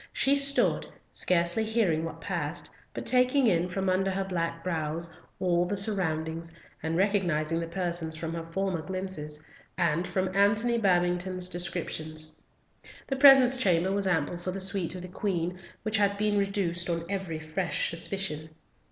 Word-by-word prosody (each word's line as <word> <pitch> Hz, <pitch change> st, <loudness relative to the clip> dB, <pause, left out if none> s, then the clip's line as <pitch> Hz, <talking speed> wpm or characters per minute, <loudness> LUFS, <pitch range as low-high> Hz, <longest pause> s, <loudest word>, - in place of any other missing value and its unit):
She 275 Hz, +1 st, +3 dB
stood, 280 Hz, 0 st, +3 dB, 0.2 s
scarcely 175 Hz, +4 st, +1 dB
hearing 215 Hz, -8 st, +1 dB
what 165 Hz, 0 st, -6 dB
passed, 170 Hz, -4 st, -4 dB, 0.2 s
but -, -, -6 dB
taking 255 Hz, +2 st, +3 dB
in, 180 Hz, -4 st, +2 dB
from 195 Hz, +2 st, -2 dB
under 190 Hz, +1 st, +2 dB
her 195 Hz, 0 st, -1 dB
black 170 Hz, -3 st, -3 dB
brows, 165 Hz, -1 st, -2 dB, 0.2 s
all 175 Hz, -2 st, +2 dB
the 200 Hz, +3 st, -2 dB
surroundings, 165 Hz, -5 st, -1 dB, 0.3 s
and 160 Hz, +1 st, -1 dB
recognising 175 Hz, -5 st, +1 dB
the 165 Hz, -, -3 dB
persons 170 Hz, -2 st, -1 dB
from 160 Hz, +1 st, -4 dB
her 170 Hz, -, -3 dB
former 180 Hz, +1 st, -2 dB
glimpses, 155 Hz, -4 st, -4 dB, 0.3 s
and 170 Hz, 0 st, +1 dB
from 185 Hz, 0 st, -2 dB
Antony 210 Hz, +4 st, +3 dB
Babington's 180 Hz, -1 st, +1 dB
descriptions. 155 Hz, -3 st, -1 dB, 0.6 s
The 270 Hz, -, -2 dB
presence 265 Hz, -2 st, +7 dB
chamber 185 Hz, -5 st, +2 dB
was 200 Hz, 0 st, 0 dB
ample 175 Hz, -1 st, 0 dB
for 175 Hz, -, -5 dB
the 190 Hz, +1 st, -3 dB
suite 190 Hz, -2 st, 0 dB
of 180 Hz, -, -7 dB
the -, -, -6 dB
Queen, 180 Hz, -2 st, -2 dB, 0.2 s
which 215 Hz, 0 st, +1 dB
had 200 Hz, -1 st, +2 dB
been 210 Hz, 0 st, +1 dB
reduced 185 Hz, -4 st, -1 dB
on 170 Hz, -1 st, -2 dB
every 190 Hz, -4 st, -3 dB
fresh 155 Hz, +3 st, -1 dB
suspicion. 165 Hz, -2 st, -2 dB
180 Hz, 155 wpm, -28 LUFS, 165-195 Hz, 0.6 s, presence